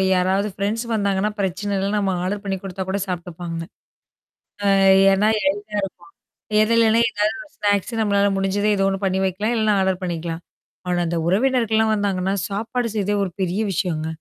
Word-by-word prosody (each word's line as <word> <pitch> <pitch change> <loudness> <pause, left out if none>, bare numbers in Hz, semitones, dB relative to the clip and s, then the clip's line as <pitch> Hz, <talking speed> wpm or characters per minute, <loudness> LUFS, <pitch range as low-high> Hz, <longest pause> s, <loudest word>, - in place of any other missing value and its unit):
யாராவது 190 +3 +1
ஃப்ரெண்ட்ஸ் 215 +4 -2
வந்தாங்கன்னா 200 -1 0
பிரச்சனை 200 +2 -2
இல்ல. 195 +1 -1
நம்ம 195 -2 0
ஆர்டர் 200 +2 -2
பண்ணி 195 -1 -2
குடுத்தா 190 0 -4
கூட 200 +1 -1
சாப்ட்டுப்பாங்க. 175 -2 -5 1.1
அ - - +5 0.4
ஏன்னா 210 +3 +3 0.2
எளிதா 205 +1 -4
இருக்கும். 175 -3 -8 0.5
எத 215 - +2
இடையில 230 0 +5
இடையில 225 - +3
ஏதாவது 215 +8 -1
ஸ்நாக்ஸ 205 +2 0
நம்மளால 200 -1 +2
முடிஞ்சத 195 +2 0
ஏதோ 195 -1 +1
ஒண்ணு 195 0 -2
பண்ணி 190 0 +1
வைக்கலாம். 205 +5 -1
இல்லன்னா 215 -2 +2
ஆர்டர 190 -1 +2
பண்ணிக்கலாம்? 170 -1 -4 0.5
ஆனா, 180 0 +1
அந்த 170 0 -1
உறவினர்கள்லாம் 220 +1 +2
வந்தாங்கன்னா, 195 -2 0 0.2
சாப்பாடு 230 +4 -2
செய்றதே 205 0 0
ஒரு 190 - -2
பெரிய 185 +3 -1
விஷயங்க. 160 -5 -1
200 Hz, 160 wpm, -21 LUFS, 185-210 Hz, 1.1 s, அ